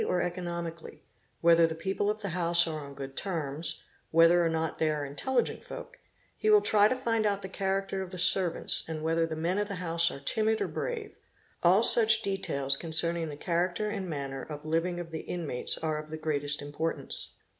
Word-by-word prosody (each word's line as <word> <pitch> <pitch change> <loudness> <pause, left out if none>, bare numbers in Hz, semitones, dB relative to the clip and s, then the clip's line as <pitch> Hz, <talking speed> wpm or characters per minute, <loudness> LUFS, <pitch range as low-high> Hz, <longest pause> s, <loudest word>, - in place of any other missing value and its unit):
THEFT - - -2
or 180 - 0
economically, 170 -2 -6 0.4
whether 170 0 +5
the 160 - -5
people 195 +4 -2
of 215 0 -3
the 200 - -3
house 170 0 +4
are 155 -2 -5
on 140 - -12
good 135 -1 -8
terms, 160 -4 -4 0.3
whether 165 +2 +4
or 165 - +1
not 160 -1 -3
they 160 - +1
are 150 -1 -2
intelligent 240 - -2
folk; - - -10 0.4
he 435 - -1
will 420 -1 +6
try 210 -1 +4
to 255 - -1
find 230 -4 -1
out 200 -2 -1
the - - -5
character 195 0 -3
of 190 - -6
the 185 - -9
servants 180 0 +6
and 155 -1 -5
whether 165 +1 0
the 160 - -5
men 170 +5 -1
of 205 - -1
the 200 - -5
house 170 -1 0
are 140 - -8
timid 220 +10 0
or - - -1
brave; 455 -4 -6 0.4
all 185 +5 +4
such 225 -2 +6
details 140 -9 -1
concerning 165 +1 +2
the 145 - -8
character 180 +6 -2
and 195 -3 -5
manner 135 -3 -5
of 150 +2 -9
living 165 +3 -1
of 170 -1 -8
the 160 - -5
inmates 160 -8 -2
are 155 -1 -3
of 155 0 -10
the 155 - -6
greatest 150 -2 -1
importance. 155 +3 -4
170 Hz, 205 wpm, -28 LUFS, 155-195 Hz, 0.4 s, will